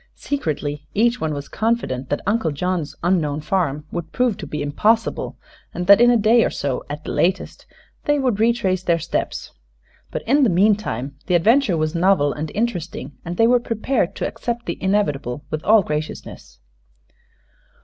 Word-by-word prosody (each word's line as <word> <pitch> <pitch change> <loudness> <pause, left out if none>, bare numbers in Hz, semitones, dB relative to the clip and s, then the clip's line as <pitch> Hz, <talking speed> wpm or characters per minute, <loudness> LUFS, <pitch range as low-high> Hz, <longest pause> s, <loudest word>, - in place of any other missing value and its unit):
Secretly 150 - -3
each 235 +3 +2
one 160 - -1
was 145 -1 -5
confident 220 - -1
that 145 - -2
Uncle 200 -3 +1
John's 165 +1 -2
unknown 160 -5 +1
farm 150 -3 -1
would 170 -2 -5
prove 250 -4 +1
to - - -7
be 150 0 -4
impossible, 215 +11 0 0.4
and 175 +1 -2
that 200 +4 +7
in 240 - +7
a 240 - +5
day 225 +2 +4
or - - +1
so 135 -3 -3
at 150 +1 -6
the - - -5
latest 185 +3 -1 0.4
they 295 0 +2
would 255 -7 0
retrace 220 -5 +1
their 170 -2 +2
steps. 165 +1 -3 0.6
But - - -5
in 280 +6 +3
the 255 - +4
meantime 175 - +1
the 180 - +2
adventure 215 +2 +3
was 155 0 -1
novel 170 -5 +3
and 150 +1 -5
interesting, 175 - -3
and 175 0 -5
they 225 - +5
were 245 +1 +4
prepared 230 -3 -1
to - - -2
accept 235 0 -4
the - - -5
inevitable 150 - -1
with 155 0 -3
all 215 0 +5
graciousness. 150 - -6
180 Hz, 170 wpm, -21 LUFS, 150-225 Hz, 0.6 s, that